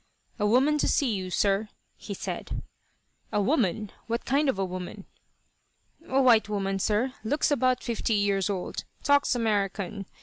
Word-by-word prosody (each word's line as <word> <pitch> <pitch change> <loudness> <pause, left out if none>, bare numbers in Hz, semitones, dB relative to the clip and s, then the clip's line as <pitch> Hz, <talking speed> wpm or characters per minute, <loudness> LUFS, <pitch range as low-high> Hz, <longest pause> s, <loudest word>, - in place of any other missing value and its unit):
"A 210 - +2
woman 270 +7 +3
to - - +1
see 260 -6 +2
you, 185 -2 -3
sir," 200 +3 +1 0.3
he - - -7
said. - - -5 0.7
"A - - +1
woman? 215 - +1 0.2
What 235 +1 -2
kind 280 +2 +2
of 235 - 0
a 195 - 0
woman?" 185 +2 -7 1.0
"A 265 - +2
white 235 -5 +5
woman, 195 -2 -1
sir. 220 +6 +1
Looks 290 +7 +1
about 255 -2 +2
fifty 230 -2 -1
years 200 -1 +1
old. 190 -3 -3 0.2
Talks 285 -2 +3
American. 200 -4 -1
215 Hz, 155 wpm, -27 LUFS, 195-255 Hz, 1.0 s, white